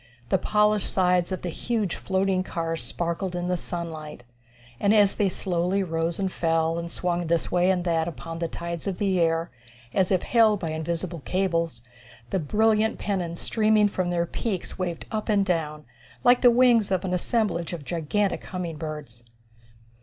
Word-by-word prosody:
The -, -, +3 dB
polished 210 Hz, -1 st, +2 dB
sides 180 Hz, -1 st, +2 dB
of 185 Hz, -, -3 dB
the 180 Hz, -, -2 dB
huge 215 Hz, 0 st, -1 dB
floating 190 Hz, 0 st, 0 dB
cars 165 Hz, -3 st, -2 dB
sparkled 175 Hz, +2 st, -3 dB
in 175 Hz, 0 st, -2 dB
the 180 Hz, -, +2 dB
sunlight, 160 Hz, -6 st, -6 dB, 0.6 s
and, 200 Hz, +7 st, +3 dB
as 205 Hz, -2 st, +5 dB
they 200 Hz, -2 st, +1 dB
slowly 180 Hz, +1 st, 0 dB
rose 165 Hz, -1 st, -1 dB
and 195 Hz, -2 st, -1 dB
fell, 165 Hz, -1 st, +1 dB
and 170 Hz, 0 st, -5 dB
swung 175 Hz, -1 st, -1 dB
this 165 Hz, 0 st, 0 dB
way 180 Hz, +1 st, +3 dB
and 180 Hz, -2 st, +2 dB
that, 165 Hz, -2 st, +1 dB
upon 165 Hz, +2 st, -6 dB
the 170 Hz, -, -1 dB
tides 170 Hz, +2 st, -5 dB
of 190 Hz, -2 st, -2 dB
the 195 Hz, -3 st, +1 dB
air, 165 Hz, 0 st, +1 dB, 0.4 s
as 190 Hz, -1 st, +2 dB
if 185 Hz, -2 st, +2 dB
held 220 Hz, -4 st, +4 dB
by 165 Hz, -3 st, -3 dB
invisible 165 Hz, +2 st, -3 dB
cables, 165 Hz, -6 st, -1 dB, 0.5 s
the 190 Hz, -, +1 dB
brilliant 220 Hz, +6 st, +2 dB
pennons 175 Hz, -4 st, -2 dB
streaming 215 Hz, -1 st, +3 dB
from 185 Hz, -3 st, -2 dB
their 170 Hz, -1 st, +1 dB
peaks 195 Hz, +1 st, -4 dB
waved 175 Hz, -3 st, -3 dB
up 215 Hz, 0 st, -3 dB
and 200 Hz, -2 st, +3 dB
down 155 Hz, -4 st, -2 dB, 0.4 s
like 245 Hz, 0 st, +5 dB
the 245 Hz, -, +8 dB
wings 240 Hz, -3 st, +4 dB
of 190 Hz, 0 st, 0 dB
an 180 Hz, -, -1 dB
assemblage 180 Hz, -3 st, 0 dB
of 165 Hz, -5 st, -6 dB
gigantic 180 Hz, +6 st, -1 dB
humming 175 Hz, -4 st, -5 dB
birds. 150 Hz, -7 st, -7 dB
180 Hz, 175 wpm, -25 LUFS, 165-200 Hz, 0.6 s, the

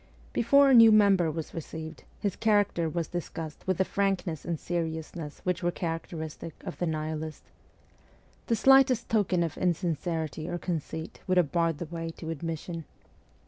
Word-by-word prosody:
Before 280 Hz, +4 st, +5 dB
a -, -, +6 dB
new 230 Hz, -2 st, +9 dB
mem 205 Hz, -2 st, +6 dB
ber 175 Hz, -3 st, +1 dB
was 160 Hz, 0 st, -5 dB
received, 160 Hz, -1 st, -7 dB
his 200 Hz, -3 st, -1 dB
character 205 Hz, -6 st, +2 dB
was 165 Hz, 0 st, -2 dB
discussed 165 Hz, -2 st, -6 dB
with 185 Hz, -2 st, +1 dB
the 190 Hz, -, +2 dB
frankness 195 Hz, -6 st, -1 dB
and 170 Hz, -2 st, -2 dB
seriousness 160 Hz, -2 st, -4 dB
which 180 Hz, +1 st, -1 dB
were 175 Hz, -, +1 dB
characteristic 165 Hz, -2 st, -5 dB
of -, -, -6 dB
the 175 Hz, -, 0 dB
Nihilist. 155 Hz, -1 st, -4 dB, 1.0 s
The 230 Hz, -, +2 dB
slightest 265 Hz, 0 st, +5 dB
token 195 Hz, -5 st, +2 dB
of 165 Hz, -2 st, -4 dB
insincerity 165 Hz, -3 st, -1 dB
or 175 Hz, -, -2 dB
conceit 160 Hz, -2 st, -4 dB
would 185 Hz, -1 st, +2 dB
have 170 Hz, -5 st, +3 dB
barred 165 Hz, -3 st, +1 dB
the 170 Hz, -, -4 dB
way 165 Hz, +1 st, -5 dB
to 160 Hz, -1 st, -5 dB
admission. 165 Hz, +1 st, -5 dB
170 Hz, 160 wpm, -28 LUFS, 160-190 Hz, 1.0 s, new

